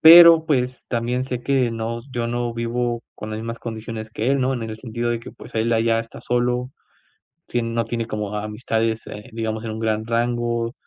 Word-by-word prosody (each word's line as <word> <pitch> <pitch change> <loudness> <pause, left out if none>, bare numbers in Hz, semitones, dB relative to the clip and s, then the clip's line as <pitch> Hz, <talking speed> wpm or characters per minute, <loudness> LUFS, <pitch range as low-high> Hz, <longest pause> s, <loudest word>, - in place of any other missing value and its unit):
Pero, 165 0 +10
pues, 130 -5 0
también 125 +1 0
sé 125 -2 -3
que 130 -3 +2
no 115 +1 -3
yo 120 -1 -1
no 120 0 -1
vivo 120 0 -1
con 110 - -7
las 110 - -3
mismas 115 +1 -4
condiciones 110 -1 -6
que 115 +4 0
él, 140 - +3
¿no?, 130 +1 +2
en 120 -3 -2
el 110 -1 -4
sentido 120 +1 -2
de 120 - 0
que, 115 - -9
pues, 120 - -13
él 115 +1 +2
allá 115 0 +3
está 115 0 -6
solo, 125 +1 0 0.8
sí 120 - 0
no 115 0 0
tiene 115 0 -3
como 105 -2 -3
amistades, 110 +1 -1
eh, 105 +1 -8
digamos, 110 -1 -2
en 110 - -3
un 110 - -5
gran 110 -1 0
rango, 120 0 0
115 Hz, 205 wpm, -23 LUFS, 110-120 Hz, 0.8 s, Pero